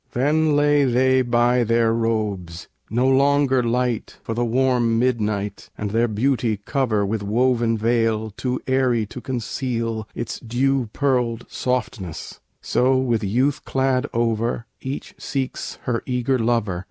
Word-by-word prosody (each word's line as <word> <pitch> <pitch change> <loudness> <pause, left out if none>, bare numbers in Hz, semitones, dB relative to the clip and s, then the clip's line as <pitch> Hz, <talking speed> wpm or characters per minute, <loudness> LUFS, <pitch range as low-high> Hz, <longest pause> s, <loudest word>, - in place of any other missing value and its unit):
Then 150 +4 +2
lay 145 0 +4
they 130 0 +3
by 120 0 +2
their 115 0 +2
robes 105 -7 -2 0.2
no 120 +4 +1
longer 135 0 +3
light 120 -1 -1
For 115 - -3
the 120 +2 0
warm 120 -1 +2
midnight 105 -4 -1
and 105 -1 -3
their 115 +2 +2
beauty 115 0 0
cover 110 -1 0
With 105 +1 -2
woven 115 +2 +1
veil 110 -1 +1
too 125 +4 -3
airy 130 -4 +2
to 120 +4 -9
conceal 115 -3 -3
Its 115 - -4
dew 125 +1 0
pearled 125 -4 0
softness; 110 -9 -3 0.2
so, 130 +1 +2
with 120 -4 0
youth 125 +8 +1
clad 135 0 0
over, 115 0 0 0.2
Each 135 +2 -5
seeks 135 -2 -4
her 120 -2 -1
eager 125 0 0
lover. 115 -6 0
120 Hz, 135 wpm, -22 LUFS, 115-130 Hz, 0.2 s, lay